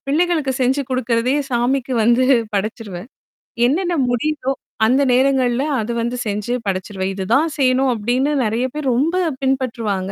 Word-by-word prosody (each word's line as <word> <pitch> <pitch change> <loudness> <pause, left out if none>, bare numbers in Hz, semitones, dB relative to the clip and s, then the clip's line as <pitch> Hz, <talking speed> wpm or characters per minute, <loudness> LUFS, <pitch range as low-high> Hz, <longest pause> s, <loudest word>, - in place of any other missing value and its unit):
பிள்ளைங்களுக்கு 310 -1 +1
செஞ்சு 265 +3 +2
குடுக்கிறதையே, 250 +2 +1
சாமிக்கு 250 +2 0
வந்து 240 +2 +4 0.3
படைச்சிருவேன். 205 -1 -4 0.6
என்னென்னா 345 +5 0 0.2
முடியுதோ! 270 +2 -1 0.4
அந்த 260 +4 +3
நேரங்கள்ல 260 -1 +2 0.2
அது 215 - -3
வந்து 240 +2 -2
செஞ்சு 210 +3 -2
படைச்சிருவேன். 190 0 -2
"இதுதான் 235 - +1
செய்யணும்!"அப்படின்னு 255 0 +1
நெறையா 230 +4 0
பேர் 290 -4 -1
ரொம்ப 300 +7 +1 0.3
பின்பற்றுவாங்க. 230 -8 -1
250 Hz, 120 wpm, -19 LUFS, 225-270 Hz, 0.6 s, வந்து